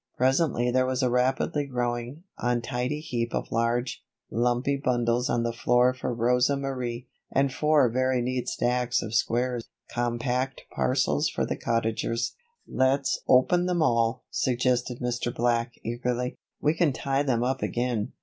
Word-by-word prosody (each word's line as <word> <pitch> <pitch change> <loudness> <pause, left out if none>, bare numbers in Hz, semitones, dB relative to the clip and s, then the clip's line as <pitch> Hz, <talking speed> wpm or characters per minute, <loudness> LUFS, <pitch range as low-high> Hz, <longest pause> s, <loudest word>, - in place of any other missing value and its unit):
Presently 130 -2 +2
there 130 +1 +2
was 130 0 0
a 125 - +2
rapidly 130 +3 +1
growing, 120 +3 -3 0.2
untidy 125 +4 -1
heap 120 -6 -2
of - - -3
large, 120 +1 0 0.3
lumpy 120 +4 +1
bundles 120 -2 0
on 120 - +1
the 115 0 -1
floor 125 +2 +3
for 130 0 -4
Rosa 125 +3 +2
Marie, 125 -3 -4 0.2
and 135 0 +2
four 150 -2 +4
very 130 +2 +1
neat 125 +1 -1
stacks 125 0 0
of 110 - -6
square, 120 +2 +1 0.3
compact 120 +2 -1
parcels 135 +4 +1
for - - -1
the - - -2
Cottagers. 115 0 -1 0.3
"Let's 135 +1 +1
open 175 +8 +4
them 175 -3 +1
all," 115 -2 +1
suggested 125 -1 0
Mr. 120 0 -1
Black, 120 0 0
eagerly. 125 +2 -2 0.2
"We 150 - +2
can 165 -4 +2
tie 135 +1 0
them 125 -5 +1
up 130 +1 -1
again." 120 -3 -1
125 Hz, 145 wpm, -27 LUFS, 120-130 Hz, 0.3 s, four